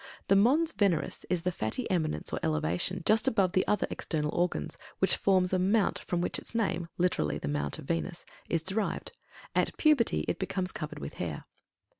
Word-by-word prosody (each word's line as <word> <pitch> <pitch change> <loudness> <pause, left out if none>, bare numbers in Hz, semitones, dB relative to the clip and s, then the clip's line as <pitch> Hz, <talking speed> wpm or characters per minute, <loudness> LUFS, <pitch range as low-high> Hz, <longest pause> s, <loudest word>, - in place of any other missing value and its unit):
THE 195 - +6
MONS 280 +11 +5
VENERIS 195 - 0
is 180 -2 0
the 180 - +1
fatty 170 - -2
eminence 155 - -1
or - - -1
elevation 85 - -1
just 220 +1 +3
above 195 -5 +3
the 185 - +3
other 210 - +2
external 150 -2 -2
organs, 170 - -1 0.2
which - - +3
forms 185 -2 +3
a 185 - +3
mount 200 +3 +2
from 175 -1 -2
which - - 0
its - - -10
name 185 -7 0
(literally, 75 - +1
"The 70 - -5
Mount 70 0 -1
of - - -9
Venus") 170 +3 -3 0.2
is 165 -1 0
derived. 195 +3 -2 0.4
At - - +1
puberty 300 -7 +3
it - - -1
becomes 185 -1 -2
covered 150 -1 -6
with 70 - -6
hair. - - -4
180 Hz, 185 wpm, -30 LUFS, 155-200 Hz, 0.4 s, THE